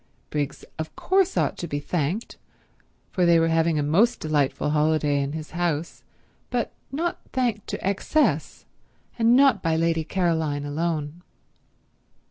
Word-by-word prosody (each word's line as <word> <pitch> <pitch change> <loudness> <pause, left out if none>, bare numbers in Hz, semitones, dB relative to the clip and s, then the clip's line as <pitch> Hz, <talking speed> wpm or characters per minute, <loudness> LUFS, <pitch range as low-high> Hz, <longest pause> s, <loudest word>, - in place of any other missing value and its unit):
Briggs 145 -1 -3
of 160 0 -5
course 380 0 +1
ought - - 0
to 170 - -4
be 145 -2 -2
thanked, 175 +7 -2 0.8
for 185 - 0
they 170 -1 +5
were 165 0 +2
having 165 0 +2
a 145 - +1
most 185 +12 +3
delightful 150 -1 0
holiday 150 -1 +2
in 140 +1 -3
his 155 -1 -6
house, 170 -2 -2 0.5
but - - -1 0.2
not 335 +5 -2
thanked 240 -5 -1
to - - -4
excess 200 +10 0 0.5
and 230 +1 +5
not 265 -7 +5
by 165 -1 +1
Lady 165 0 +1
Caroline 160 -4 0
alone. 155 +1 -2
165 Hz, 140 wpm, -25 LUFS, 150-195 Hz, 0.8 s, they